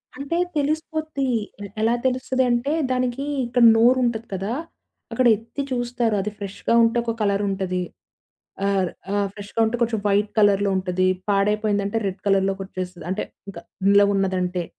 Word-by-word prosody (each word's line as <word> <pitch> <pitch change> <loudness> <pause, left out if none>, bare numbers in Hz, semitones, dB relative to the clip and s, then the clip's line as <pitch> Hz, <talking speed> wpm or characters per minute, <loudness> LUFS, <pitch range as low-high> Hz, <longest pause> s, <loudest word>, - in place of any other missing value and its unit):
అంటే 280 +6 -3 0.2
తెలిసిపోద్ది. 310 -1 -1 0.5
ఎలా 225 +2 +3
తెలుస్తది 260 0 +1
అంటే, 240 +5 0 0.2
దానికి 255 +1 -1 0.2
ఇక్కడ 245 0 +2
నోరు 240 +3 +5
ఉంటది 230 -1 -2
కదా! 195 +4 -2 0.6
అక్కడ 255 - +1
ఎత్తి 230 +5 -7
చూస్తారు. 240 -2 0
అది 210 - -3
ఫ్రెష్‌గా 200 +3 -3
ఉంటే 230 +1 +2
ఒక 230 -1 -2
కలర్ 200 0 +1
ఉంటది. 185 -2 -2 0.8
ఆ - - +2 0.5
ఆ! - - +1 0.2
ఫ్రెష్‌గా 205 +2 -5
ఉంటే 225 +2 -1
కొంచెం 225 -2 0
వైట్ 205 +1 +2
కలర్‌లో 200 -1 +4
ఉంటది. 185 0 0 0.2
పాడైపోయిందంటే 205 +1 +1
రెడ్ 190 0 -4
కలర్‌లోకి 195 0 +1
వచ్చేస్తది. 185 -3 -7
అంటే 190 - -1 0.3
ఇంక - - -10 0.3
నిలవ 200 0 +5
ఉన్నదంటే. 185 -2 -1
210 Hz, 140 wpm, -23 LUFS, 195-245 Hz, 0.8 s, నోరు